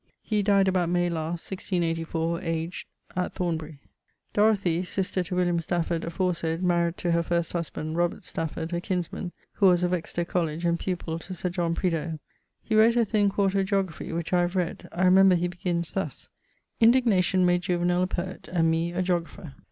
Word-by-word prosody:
He 210 -2 0
dyed 200 -1 +3
about 180 -2 +1
May 175 0 +1
last, 165 +2 -4
1684, 165 -2 -1
aged... 165 0 -3 0.5
Thornbury. 160 -4 -3 0.6
Dorothy, 200 -5 +3
sister 185 0 -1
to 180 +1 -4
William 175 -1 +2
Stafford 170 0 -1
aforesayd, 170 -1 -1
married 170 -1 +1
to 175 - -1
her 170 0 +3
first 170 0 -1
husband, 160 -2 -3 0.3
Stafford, 160 0 -4
her 175 - -1
kinsman, 180 0 -3 0.2
who 200 - +4
was 180 -1 +4
of 180 0 +1
Exeter 170 0 -2
Coll., 175 -1 0
and 170 +2 -1
pupill 170 -3 -3
to 185 - -8
Dr. 180 0 -2
John 170 -2 -1
Prideaulx. 165 -3 -1 0.5
He 220 - -3
wrote 220 +2 +5
a 235 -1 +3
thin 205 -1 +2
4to 195 0 +1
Geographie, 190 -4 -2
which 165 +1 -3
I 180 - +4
have 175 +1 -1
read. 180 -3 -2
I 185 +2 +1
remember 190 0 +6
he 175 +1 0
begins 175 -1 -3
thus: 195 - -4 0.5
'Indignation 220 -6 +4
made 175 0 +3
Juvenal 175 0 +1
a 185 - +2
poet 185 0 -5
and 165 -2 +2
me 165 +1 0
a 185 +1 0
geographer.' 170 -4 -3
175 Hz, 175 wpm, -26 LUFS, 170-185 Hz, 0.6 s, remember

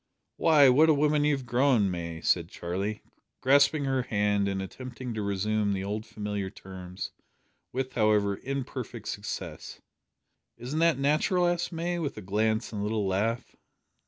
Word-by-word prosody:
"Why, 150 -4 +6
what 150 +5 +6
a 155 - +6
woman 150 0 +2
you 150 -1 +3
have 130 - -9
grown, 120 -5 +3
May!" 85 -2 -5
said 85 -2 +1
Charlie, 95 +5 -4 0.4
grasping 140 +2 +4
her 135 -1 +1
hand, 105 -3 +1
and 100 -1 -1
attempting 125 +5 -6
to 110 - -3
resume 100 +1 0
the 95 -1 -2
old 105 +2 -4
familiar 105 -2 -4
terms 95 -1 -8 0.6
with, 130 0 -3
however, 105 -3 +2
imperfect 125 -4 -5
success. 100 0 -6 0.8
"Isn't 130 +6 -4
that 165 -4 +4
natural?" 155 +6 +2
asked 175 +1 0
May, 170 +1 -2
with 145 -7 -3
a - - -5
glance 110 +4 0
and 105 - -3
a - - -1
little 105 -1 0
laugh. 105 +5 -1
110 Hz, 160 wpm, -28 LUFS, 100-140 Hz, 0.8 s, Why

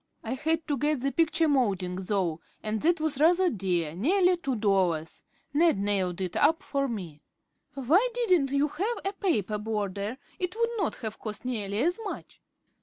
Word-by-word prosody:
I 225 - -3
had 320 +4 -1
to 290 -4 -1
get 295 -1 +1
the 275 +1 0
picture 330 +1 +2
moulding, 200 -11 +1
though, 185 -4 -1 0.2
and 215 0 -2
that 340 +1 +3
was 310 -3 -1
rather 350 +4 +4
dear, 175 -6 -1
nearly 360 - +3
two 275 -7 -2
dollars. 185 -7 0 0.3
Ned 320 -3 +4
nailed 195 -3 0
it 185 -2 -3
up 320 +3 +3
for 275 -1 -1
me." 180 - -6 0.5
"Why 320 - +3
didn't 365 - +2
you 280 +2 +2
have 405 +10 -2
a 390 - -1
paper 215 - 0
border; 210 +1 -3 0.2
it 365 +2 -2
would 465 0 +2
not 370 - 0
have 220 - -5
cost 215 +2 -6
nearly 205 -5 -2
as 350 +6 +1
much?" 410 - -7
260 Hz, 175 wpm, -28 LUFS, 200-330 Hz, 0.5 s, rather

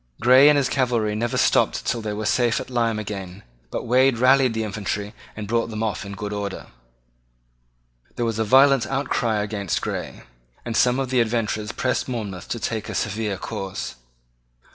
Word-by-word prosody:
Grey 130 +4 +7
and 150 - +5
his 140 -2 +2
cavalry 120 -5 0
never 120 +4 -1
stopped - - +2
till 115 - -1
they 110 -1 -3
were 105 +1 -4
safe 120 +2 +2
at - - -8
Lyme 115 -3 +1
again: 100 -3 -6 0.3
but - - -4
Wade 130 +1 +3
rallied 130 -1 +4
the 110 - -1
infantry 105 0 -4 0.2
and 105 -1 -6
brought 115 +2 0
them 110 0 -3
off 105 -3 -2
in 100 0 -7
good 105 +1 -5
order. 100 -1 -4 1.5
There 120 - -1
was 115 -1 -2
a - - +2
violent 130 +1 +5
outcry 120 -5 0
against 100 -3 -2
Grey; - - -5 0.4
and 115 -2 -3
some 125 +2 +3
of 130 -1 -2
the 125 -2 +3
adventurers 110 -2 -1
pressed 130 0 -1
Monmouth 105 -7 -5
to 120 - -3
take 110 -1 -3
a - - -5
severe 105 -1 -2
course. 95 0 -5
110 Hz, 180 wpm, -23 LUFS, 105-125 Hz, 1.5 s, Grey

